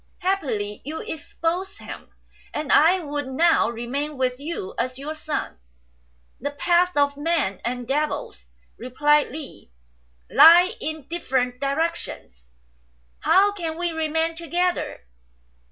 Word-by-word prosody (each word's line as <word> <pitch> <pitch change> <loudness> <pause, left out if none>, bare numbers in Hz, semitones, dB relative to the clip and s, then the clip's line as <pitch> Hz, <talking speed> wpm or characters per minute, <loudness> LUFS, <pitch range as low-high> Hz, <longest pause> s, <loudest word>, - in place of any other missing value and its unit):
Happily 265 - -1
you 310 +4 -5
exposed 335 +4 -3
him; - - -10 0.5
and 300 -1 -2
I 355 +4 +5
would 290 -3 -4
now 320 -1 +3
remain 265 +6 -4
with 255 -1 0
you 360 +8 -5
as 255 0 -2
your 290 +3 -5
son." 310 - -4 0.8
"The 285 - -2
paths 345 +3 +2
of 285 0 +2
men 295 - 0
and 245 0 -3
devils," 275 - -2 0.3
replied 295 +5 +2
Li, 285 - -9 0.6
"lie 350 - +8
in 315 -3 -5
different 255 -7 -1
directions. 280 - -3 0.7
How 400 +2 +4
can 335 -5 -4
we 350 0 -1
remain 320 +1 0
together 345 - -1
300 Hz, 120 wpm, -24 LUFS, 265-335 Hz, 0.8 s, lie